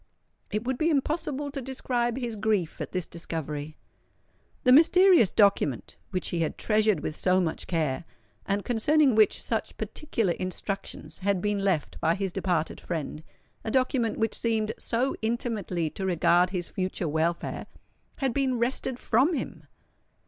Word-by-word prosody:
It 210 Hz, +1 st, -2 dB
would 255 Hz, 0 st, -2 dB
be 320 Hz, -, +3 dB
impossible 295 Hz, -1 st, -1 dB
to 275 Hz, -1 st, -5 dB
describe 245 Hz, -2 st, -1 dB
his 240 Hz, -4 st, -3 dB
grief 205 Hz, -6 st, 0 dB
at -, -, -4 dB
this 185 Hz, -3 st, -2 dB
discovery. 155 Hz, -3 st, -5 dB, 0.9 s
The 250 Hz, -, +5 dB
mysterious 335 Hz, -, +7 dB
document, 200 Hz, -, +2 dB
which 185 Hz, -2 st, -2 dB
he 175 Hz, -, -2 dB
had 160 Hz, -2 st, -1 dB
treasured 215 Hz, -6 st, +2 dB
with 150 Hz, -, -4 dB
so 185 Hz, +2 st, +2 dB
much 170 Hz, -3 st, -2 dB
care, 155 Hz, -5 st, -1 dB, 0.4 s
and 200 Hz, 0 st, -1 dB
concerning 265 Hz, +4 st, +3 dB
which 215 Hz, -1 st, +4 dB
such -, -, -3 dB
particular 230 Hz, -, -1 dB
instructions 190 Hz, +2 st, -5 dB
had 195 Hz, -1 st, +1 dB
been 205 Hz, +2 st, 0 dB
left 190 Hz, -6 st, -1 dB
by 165 Hz, +1 st, +2 dB
his 195 Hz, -2 st, -2 dB
departed 175 Hz, -4 st, -1 dB
friend,—a 160 Hz, +5 st, -7 dB
document 255 Hz, -2 st, +1 dB
which 225 Hz, -1 st, 0 dB
seemed 220 Hz, -2 st, 0 dB
so 245 Hz, +3 st, 0 dB
intimately 220 Hz, -, -1 dB
to 195 Hz, -, -6 dB
regard 175 Hz, 0 st, +3 dB
his 180 Hz, -2 st, -3 dB
future 185 Hz, -2 st, -3 dB
welfare,—had 170 Hz, -, -3 dB
been 265 Hz, -2 st, +1 dB
wrested 240 Hz, +1 st, -1 dB
from 260 Hz, +9 st, +2 dB
him! -, -, -5 dB
210 Hz, 145 wpm, -27 LUFS, 175-250 Hz, 0.9 s, mysterious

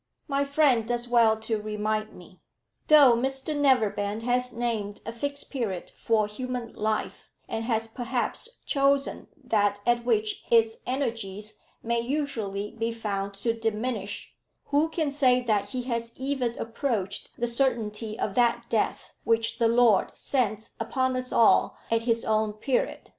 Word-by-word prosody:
"My 280 Hz, -1 st, +1 dB
friend 275 Hz, -6 st, +3 dB
does 240 Hz, 0 st, -1 dB
well 230 Hz, -2 st, +4 dB
to 220 Hz, -1 st, -2 dB
remind 215 Hz, 0 st, -2 dB
me. 180 Hz, +1 st, -15 dB, 0.5 s
Though 290 Hz, -5 st, +8 dB
Mr 265 Hz, +5 st, -1 dB
Neverbend 225 Hz, -6 st, +1 dB
has 250 Hz, +1 st, +2 dB
named 225 Hz, -4 st, -2 dB
a 225 Hz, -, -4 dB
Fixed 280 Hz, +5 st, -3 dB
Period 220 Hz, -10 st, -3 dB
for 220 Hz, -2 st, +1 dB
human 245 Hz, +2 st, -5 dB
life, 215 Hz, 0 st, -3 dB, 0.2 s
and 225 Hz, 0 st, -3 dB
has 225 Hz, -2 st, 0 dB
perhaps 250 Hz, -, -3 dB
chosen 275 Hz, -1 st, +1 dB, 0.2 s
that 205 Hz, -4 st, +1 dB
at 240 Hz, 0 st, +2 dB
which 420 Hz, -, 0 dB
its 455 Hz, -1 st, +4 dB
energies 215 Hz, -5 st, -2 dB, 0.2 s
may 235 Hz, +1 st, 0 dB
usually 230 Hz, -7 st, -2 dB
be 230 Hz, 0 st, -2 dB
found 200 Hz, -3 st, -3 dB
to 230 Hz, +4 st, -1 dB
diminish, 225 Hz, -2 st, -3 dB, 0.3 s
who 295 Hz, +3 st, +2 dB
can 315 Hz, -3 st, -1 dB
say 260 Hz, -3 st, +4 dB
that 215 Hz, -5 st, 0 dB
he 255 Hz, -2 st, -3 dB
has 235 Hz, -2 st, -3 dB
even 260 Hz, -3 st, -2 dB
approached 225 Hz, -4 st, -3 dB
the 240 Hz, -, +1 dB
certainty 230 Hz, -3 st, 0 dB
of 195 Hz, -, -2 dB
that 235 Hz, +1 st, +2 dB
death 220 Hz, -2 st, -1 dB
which 230 Hz, +1 st, +1 dB
the 230 Hz, -, +4 dB
Lord 230 Hz, -3 st, +3 dB
sends 220 Hz, -5 st, 0 dB
upon 255 Hz, +3 st, 0 dB
us 255 Hz, 0 st, -3 dB
all 230 Hz, -, +4 dB
at 230 Hz, 0 st, +3 dB
His 230 Hz, 0 st, +2 dB
own 215 Hz, -1 st, +1 dB
period? 245 Hz, +4 st, -2 dB
235 Hz, 145 wpm, -27 LUFS, 215-260 Hz, 0.5 s, Though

